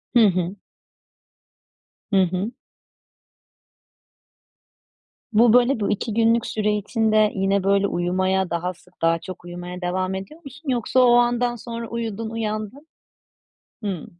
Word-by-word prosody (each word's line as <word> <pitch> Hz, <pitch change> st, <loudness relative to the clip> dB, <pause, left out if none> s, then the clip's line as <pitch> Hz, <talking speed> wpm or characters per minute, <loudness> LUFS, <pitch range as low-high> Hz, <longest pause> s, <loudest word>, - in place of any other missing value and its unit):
Hı 225 Hz, -3 st, +7 dB
hı. 180 Hz, +1 st, -1 dB, 1.6 s
Hı 190 Hz, -, +6 dB
hı. 185 Hz, +5 st, -1 dB, 2.8 s
Bu 225 Hz, +1 st, +5 dB
böyle 245 Hz, 0 st, +4 dB
bu 200 Hz, -, -1 dB
2 210 Hz, +2 st, -2 dB
günlük 230 Hz, +1 st, +3 dB
süre 210 Hz, -1 st, 0 dB
içinde 215 Hz, 0 st, +2 dB
yine 195 Hz, 0 st, +1 dB
böyle 200 Hz, 0 st, +3 dB
uyumaya 185 Hz, +1 st, 0 dB
daha 175 Hz, +2 st, -2 dB
sık 180 Hz, 0 st, -25 dB
daha 165 Hz, 0 st, +2 dB
çok 180 Hz, 0 st, -9 dB
uyumaya 175 Hz, +1 st, -7 dB
devam 185 Hz, +1 st, -1 dB
ediyor 195 Hz, -, -8 dB
musun? 275 Hz, +2 st, -9 dB
Yoksa 250 Hz, +1 st, +1 dB
o 245 Hz, -1 st, +6 dB
andan 240 Hz, 0 st, +2 dB
sonra 230 Hz, 0 st, -6 dB
uyudun, 225 Hz, -1 st, -4 dB
uyandın. 225 Hz, +5 st, -4 dB, 1.0 s
Hımm. 190 Hz, -6 st, -3 dB
210 Hz, 125 wpm, -23 LUFS, 185-235 Hz, 2.8 s, Hı